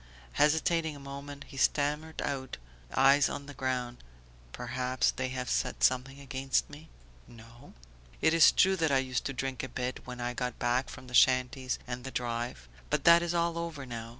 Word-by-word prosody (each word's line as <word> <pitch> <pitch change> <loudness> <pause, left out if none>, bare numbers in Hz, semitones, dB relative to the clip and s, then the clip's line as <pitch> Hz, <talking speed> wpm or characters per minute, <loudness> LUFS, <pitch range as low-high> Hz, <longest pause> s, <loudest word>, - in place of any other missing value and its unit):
Hesitating 160 - +2
a - - -10
moment 140 +1 -8
he 135 - -13
stammered 150 +3 0
out, 135 -2 -4 0.3
eyes 135 +1 +5
on 140 - -6
the 145 - -9
ground: 125 -2 -2 0.5
"Perhaps... 125 - -1
they 130 0 -3
have 130 0 -4
said - - -1
something 130 +2 +2
against 135 -1 -1
me?" 150 +2 -12 0.4
"No." 115 0 -15 0.5
"It 160 - +3
is 165 -1 +7
true 190 0 +4
that 160 -3 +1
I 135 - +4
used 130 -2 -1
to 135 - -2
drink 135 -1 -3
a 130 - -5
bit, 125 0 -3
when 125 0 -7
I 120 0 -2
got 125 -1 -3
back 125 +1 0
from - - -10
the 125 - -12
shanties 130 +1 +3
and 125 0 -5
the 130 - -5
drive; 120 - -4 0.2
but - - 0
that 170 0 +7
is 175 0 -2
all 170 0 0
over 165 -5 -5
now. 115 -2 -6
130 Hz, 185 wpm, -30 LUFS, 125-145 Hz, 0.5 s, is